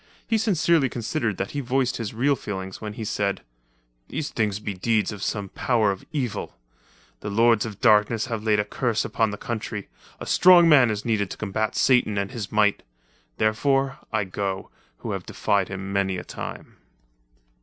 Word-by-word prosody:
He 225 -1 +1
sincerely 170 - +2
considered 115 - -2
that 100 - -3
he 145 - -3
voiced 130 -1 0
his 115 -3 -4
real 135 +5 +2
feelings 95 -5 -6
when 105 -1 -5
he 110 0 -6
said: 100 -2 -1 0.6
"These 155 -2 -4
things 105 -4 -1
be 105 -1 -4
deeds 105 +2 0
of 105 -2 -8
some 100 -1 -2
power 110 -3 +1
of 95 - -6
evil. 130 - -3 0.6
The 105 - -5
lords 115 +1 +3
of 105 -3 -9
darkness 110 0 +4
have 115 -4 -4
laid 105 -1 +2
a 105 - +1
curse 115 +1 -1
upon 110 -1 +1
the 105 - -5
country. 110 -3 -5 0.3
A - - -6
strong 180 -2 +7
man 140 -7 +6
is 105 -1 -3
needed 105 -4 0
to - - -7
combat 110 +1 -2
Satan 125 -5 +3
and 100 +3 -1
his 115 -6 -6
might. 105 -1 +2 0.6
Therefore 135 +5 +1
I 110 -2 +1
go, 95 0 -4 0.3
who - - -5
have - - -5
defied 100 -2 0
him 95 0 -6
many 95 -1 0
a 90 - -5
time." - - -8
110 Hz, 180 wpm, -24 LUFS, 100-125 Hz, 0.6 s, strong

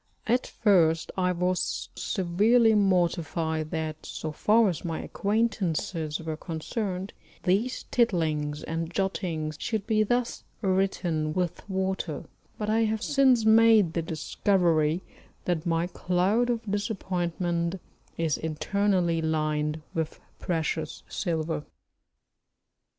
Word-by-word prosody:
At 245 +3 +1
first 170 -7 +3
I 180 -1 +1
was 180 +1 -1
severely 215 +5 +3
mortified 170 -5 +1
that 155 -1 -4
so 155 - -5
far 215 +8 +4
as 175 -5 -2
my 165 -2 -3
acquaintances 190 -7 -1
were 160 -1 -4
concerned 185 +4 -4 0.3
these 210 +8 +1
tittlings 155 -10 +1
and 165 0 -3
jottings 170 -5 -2
should 220 -4 -2
be 215 -1 +2
thus 240 +3 0 0.2
written 185 -5 0
with 180 +2 -2
water, 190 -5 -2 0.3
but 210 - -3
I 225 +1 +3
have 220 +1 -1
since 265 -5 +4
made 220 -5 +6
the 170 - 0
discovery 165 0 +1 0.4
that 175 -2 -1
my 165 0 +1
cloud 185 +7 +1
of 235 -2 0
disappointment 180 -4 -2 0.4
is 160 -4 0
internally 175 +1 +1
lined 155 -1 -1
with 160 -1 -3 0.2
precious 160 -2 -2
silver. 160 -4 -2
180 Hz, 110 wpm, -27 LUFS, 160-205 Hz, 0.4 s, made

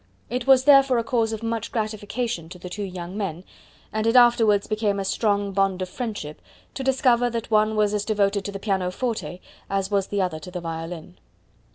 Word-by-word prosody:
It 250 +1 -2
was 265 -1 +6
therefore 275 -2 +6
a 230 - +1
cause 225 -1 0
of 220 0 -5
much 230 -1 -3
gratification 215 -4 -3
to 180 - -10
the 180 0 -9
two 210 - -5
young 180 -2 -6
men, 185 -5 -4 0.5
and 215 +1 0
it 230 - +2
afterwards 230 -4 +5
became 210 -2 0
a 195 - -2
strong 200 0 0
bond 195 -1 +1
of 185 - -6
friendship, 205 - -5 0.3
to 270 - -5
discover 255 -2 +3
that 230 -1 -5
one 215 0 +3
was 210 -1 +2
as 210 -1 0
devoted 205 -2 +1
to 200 - -3
the 200 - -5
pianoforte 195 +1 -2 0.3
as 195 0 -1
was 195 -2 +1
the 205 - -2
other 180 -4 -1
to 155 - -10
the 180 0 -5
violin. 165 +1 -7
205 Hz, 200 wpm, -24 LUFS, 190-230 Hz, 0.5 s, was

